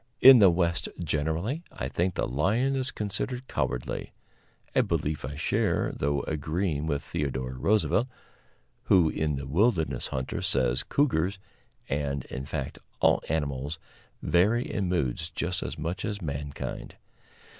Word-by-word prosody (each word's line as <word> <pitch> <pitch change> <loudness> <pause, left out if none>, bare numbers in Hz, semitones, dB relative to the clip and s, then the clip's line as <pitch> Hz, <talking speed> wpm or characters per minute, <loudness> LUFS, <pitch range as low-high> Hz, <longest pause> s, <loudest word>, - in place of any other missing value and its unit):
In 130 0 +10
the 100 -3 +8
West 85 -1 +1
generally, 80 - -1
I 65 - -4
think, 85 +7 -1
the - - 0
lion 105 - +1
is 130 0 -1
considered 125 +5 -3
cowardly - - -3 0.6
a - - +5
belief 75 0 -1
I 70 +3 -5
share, - - +1
though 70 0 0
agreeing 80 +1 -2
with 70 -2 -1
Theodore 65 -3 -3
Roosevelt, 105 - +2 0.8
who 85 -4 +5
in 75 -1 -1
"The 70 +1 -5
Wilderness 85 - +1
Hunter" 65 0 -3
says 60 -2 +2
cougars, 100 - +1 0.5
and, 70 -1 -2
in 65 0 -6
fact, - - -4 0.2
all - - +4
animals 75 -1 -1 0.5
vary 105 +8 +3
in 95 -3 -1
moods 70 -9 -1
just 90 +1 -2
as - - -4
much 85 +5 -3
as 100 -1 -3
mankind. 70 -3 -5
80 Hz, 135 wpm, -28 LUFS, 70-100 Hz, 0.8 s, In